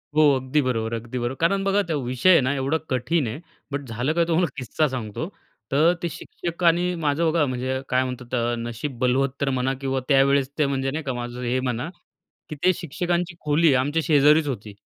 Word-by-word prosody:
हो 155 - +5
अगदी 130 +3 0
बरोबर-अगदी 115 -1 -2
बरोबर. 120 +2 -2
कारण 195 +4 +2
बघा 195 +1 +2
तो 155 - 0
विषय 125 +9 +1
आहे 165 - +7
ना, 130 +2 +1
एवढा 140 +3 0
कठीण 130 +3 0
आहे, 115 +8 -5 0.3
बट 140 0 -2
झालं 120 +7 -1
काय 170 0 +2
तुम्हाला 170 +1 +2
किस्सा 150 +4 0
सांगतो. 125 +3 -4 0.4
तर 155 +5 +4
ते 170 - 0
शिक्षकांनी 175 +1 0
माझं 160 +3 +2
बघा 160 -3 +2
म्हणजे 130 +1 -2
काय 130 +1 +2
म्हणतात 125 -1 -5
त्या 120 -1 0
नशीब 120 +3 -5
बलवत्तर 135 +2 +1
म्हणा 130 0 0
किंवा 135 -1 -1
त्यावेळेस 135 -1 +4
ते 150 - +4
म्हणजे 135 -1 -1
नाही 155 +2 -4
का, 135 - -2
माझं 120 0 -5
हे 125 +2 0
म्हणा 125 +4 -2 0.6
की 155 - -5
ते 185 +1 +5
शिक्षकांची 175 +2 -2
खोली 150 0 +3
आमच्या 145 +4 0
शेजारीच 150 0 +5
होती. 110 -6 -5
135 Hz, 190 wpm, -24 LUFS, 125-160 Hz, 0.6 s, आहे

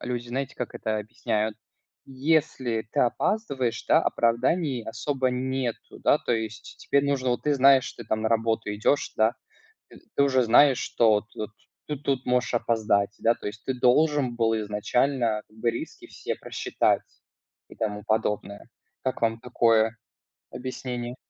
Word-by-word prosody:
люди 120 -1 -4
знаете 135 +2 -3
как 125 - -5
это 110 -1 -2
объясняют: 110 0 -2 0.5
если 135 -5 0
ты - - +1
опаздываешь, 130 - 0
да, - - +6
оправданий 125 +2 +1
особо 130 +3 -1
нету, 130 -1 -3
да. - - +3
То - - -5
есть 110 -2 -4
теперь 140 0 +1
нужно, 135 -3 0
вот 120 - -1
ты 150 -1 +2
знаешь, 135 -1 +5
ты 120 - -10
там 110 0 -1
на 110 - +1
работу 115 -2 0
идёшь, 105 +7 0
да. 110 +1 +3 0.6
Т - - -15 0.2
ты - - +4
уже 130 -2 +3
знаешь, 130 +3 +5
что 115 -2 +2
вот 105 0 +1
вот 110 +1 -4 0.4
ты 150 - -2
тут 135 -2 -2
можешь 125 0 +1
опоздать, 110 -3 +1
да. 115 +1 +3
То - - -9
есть 105 +2 -7
ты 130 - -1
должен 130 +1 +3
был 115 -1 +2
изначально 110 +2 0
как 110 - -23
бы 115 +1 +1
риски 115 - -7
все - - -4
просчитать - - 0 0.7
и - - -14
тому 105 -1 -3
подобное. 105 -2 -2 0.4
Как 130 -2 -2
вам 115 0 +1
такое 115 -2 +2 0.5
объяснение? 125 -1 -5
120 Hz, 160 wpm, -26 LUFS, 110-130 Hz, 0.7 s, да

